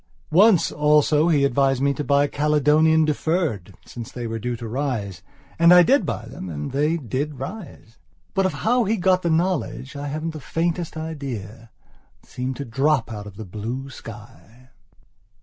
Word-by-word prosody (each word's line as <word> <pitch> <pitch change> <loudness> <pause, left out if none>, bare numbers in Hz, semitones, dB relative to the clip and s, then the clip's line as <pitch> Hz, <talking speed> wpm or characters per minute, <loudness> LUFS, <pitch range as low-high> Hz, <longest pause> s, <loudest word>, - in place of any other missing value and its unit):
Once 190 +2 +5
also 150 +1 +3
he 145 -5 +3
advised 135 0 +2
me 140 +1 +2
to 150 - -4
buy 140 0 +3
Caledonian 150 +2 +3
Deferred, 150 - -1
since 120 -2 -9
they 120 -1 -6
were 115 0 -4
due 120 +2 -3
to 115 0 -7
rise. 115 -7 -3 0.4
And 170 +1 +6
I 180 0 +9
did 275 +8 +3
buy - - -3
them 95 - -8
and 75 -2 -5
they 150 +5 +1
did 140 +2 -4
rise. 140 - -9 0.3
But 195 -1 +2
of - - -4
how 245 +2 +3
he 220 +3 0
got 185 0 +2
the 170 - -1
knowledge 160 -6 -1
I 145 +1 -5
haven't 155 +3 -3
the 155 - -8
faintest 165 +2 -2
idea. 125 -9 -6 0.5
It - - -25
seemed 130 +1 -4
to 140 - -6
drop 135 +1 +1
out 105 -1 -7
of 100 -1 -12
the 110 - -7
blue 115 +8 -6
sky. 115 +2 -13
140 Hz, 175 wpm, -22 LUFS, 120-160 Hz, 0.5 s, I